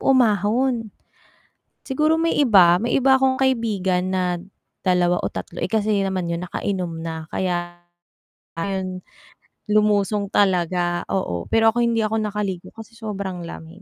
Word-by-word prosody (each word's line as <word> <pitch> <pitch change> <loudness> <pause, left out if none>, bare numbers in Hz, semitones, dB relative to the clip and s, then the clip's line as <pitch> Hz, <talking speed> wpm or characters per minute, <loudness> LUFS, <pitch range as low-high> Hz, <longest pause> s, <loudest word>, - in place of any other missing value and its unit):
umahon. 230 -1 +2 0.9
Siguro 305 +4 +2
may 330 - +1
iba, 195 -11 +6
may 235 +2 -1
iba 265 +1 +5
akong 265 0 +1
kaibigan 210 -8 +1
na, 180 -1 0 0.5
2 180 -1 +2
o - - -2
3 - - -7
eh, - - -2
kasi 215 -2 +1
naman 190 -2 -2
yung 170 +1 -3
naka-inom 180 -3 -3
na 160 -1 -5
kaya, 175 -1 -3 0.7
ayun 185 0 -3 0.7
lumusong 210 -1 +2
talaga, 175 -3 +1
oo 90 - -2
pero 225 0 +4
ako 240 - 0
hindi 230 -2 +1
ako 220 +1 0
naka-ligo 205 -4 -3
kasi 225 0 -11
sobrang 200 -5 -5
lamig. 170 +2 -10
200 Hz, 135 wpm, -22 LUFS, 180-225 Hz, 0.9 s, iba